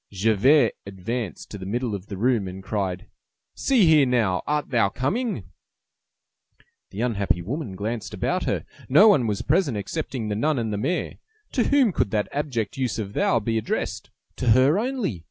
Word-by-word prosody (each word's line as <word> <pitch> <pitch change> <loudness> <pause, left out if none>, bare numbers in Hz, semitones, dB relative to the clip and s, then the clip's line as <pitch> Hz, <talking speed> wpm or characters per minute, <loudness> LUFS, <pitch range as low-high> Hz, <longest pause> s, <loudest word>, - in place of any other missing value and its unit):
Javert 115 +7 +4 0.2
advanced 100 - -5
to 100 - -7
the 95 - -7
middle 120 +2 -2
of 100 0 -6
the 100 - -6
room, 115 -2 +1
and 95 +1 -8
cried:— 95 -3 -3 0.5
"See 255 -8 +3
here 155 -4 +5
now! 110 -7 +1
Art 150 -1 -1
thou 115 -6 +3
coming?" 180 - -2 1.5
The 100 - -6
unhappy 100 -7 0
woman 115 - -4
glanced 110 +3 -4
about - - -1
her. - - -1 0.2
No 175 +12 +7
one 135 - +4
was 105 -2 -2
present 150 - +1
excepting 125 +1 -4
the 105 - -2
nun 150 +7 +1
and 110 -3 -2
the - - -1
mayor. 175 +12 -2 0.3
To 245 - +1
whom 275 -6 +4
could 135 - 0
that 105 0 0
abject 135 -7 -2
use 130 -4 -1
of 100 -3 -5
"thou" 115 - +2
be 115 +1 -1
addressed? 110 - -3 0.3
To 125 - -3
her 140 +8 +4
only. 235 - -2
115 Hz, 175 wpm, -24 LUFS, 100-145 Hz, 1.5 s, No